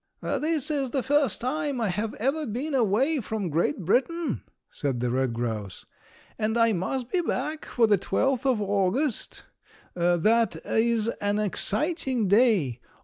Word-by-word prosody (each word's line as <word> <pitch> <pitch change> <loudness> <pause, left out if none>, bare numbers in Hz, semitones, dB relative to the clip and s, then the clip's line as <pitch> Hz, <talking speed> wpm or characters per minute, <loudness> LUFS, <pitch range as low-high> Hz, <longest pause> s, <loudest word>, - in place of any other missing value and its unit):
"This 310 -2 -1
is 275 -3 -1
the 265 0 -1
first 290 -1 +1
time 285 +1 -2
I 225 -3 0
have 210 +4 -2
ever 280 +6 -1
been 260 +8 -3
away 260 +5 +2
from 210 -6 -3
Great 160 +2 0
Britain," 320 - 0 0.3
said 135 -4 -2
the 125 0 -1
red 130 0 0
grouse, 110 -5 -4 0.5
"and 220 +1 0
I 230 -1 +4
must 235 +7 -3
be 365 - +2
back 310 -1 -3
for 235 - +2
the 205 -3 +3
12th 265 +6 0
of 235 - -1
August. 205 +6 -1 0.5
That 180 +5 +2
is 225 -1 +1
an 205 -3 -1
exciting 240 - +1
day! 195 - +3
225 Hz, 145 wpm, -26 LUFS, 190-270 Hz, 0.5 s, I